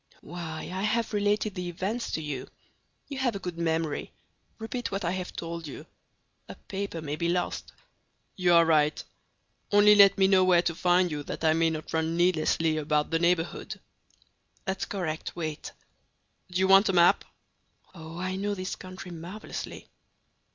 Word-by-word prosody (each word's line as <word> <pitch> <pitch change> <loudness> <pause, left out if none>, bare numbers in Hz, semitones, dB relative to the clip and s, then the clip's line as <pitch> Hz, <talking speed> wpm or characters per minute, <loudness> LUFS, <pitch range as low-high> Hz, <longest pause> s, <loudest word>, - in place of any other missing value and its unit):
"Why, 160 -1 -6
I 190 - -3
have 220 +2 0
related 205 0 +1
the 180 -1 -4
events 195 +7 -3
to 160 - -2
you. 145 -4 -5 0.6
You 275 -2 -6
have 245 -5 0
a - - -3
good 180 -3 -6
memory; 160 -2 -1 0.5
repeat 235 +2 -4
what 195 -2 -2
I 170 - +1
have 185 -1 -4
told 170 -1 -5
you. 140 - -9 0.6
A - - -7
paper 195 -4 -5
may 145 -1 -3
be 170 +2 -1
lost." 175 0 -2 0.6
"You 180 -2 +3
are 170 0 +7
right; 155 -2 +2 0.7
only 205 0 +7
let 200 -1 +7
me 190 -1 +5
know 190 -1 +5
where 180 -2 +4
to 170 - 0
find 180 +1 +2
you 150 -1 -3
that - - -6
I 160 -1 +4
may 165 0 +3
not 155 -1 -5
run 160 +1 0
needlessly 165 -2 +2
about 150 0 0
the 165 - +2
neighborhood." 170 0 0 0.9
"That's 190 -1 -2
correct; 165 -6 -4
wait!" 155 -3 -5 0.8
"Do 180 - -2
you 190 0 +3
want 195 +2 +6
a - - +1
map?" 175 -1 +5 0.7
"Oh, 165 -1 -9
I 185 +1 -3
know 205 +1 -1
this 185 -1 -4
country 185 0 -9
marvelously!" 175 +6 -7
175 Hz, 170 wpm, -28 LUFS, 160-195 Hz, 0.9 s, are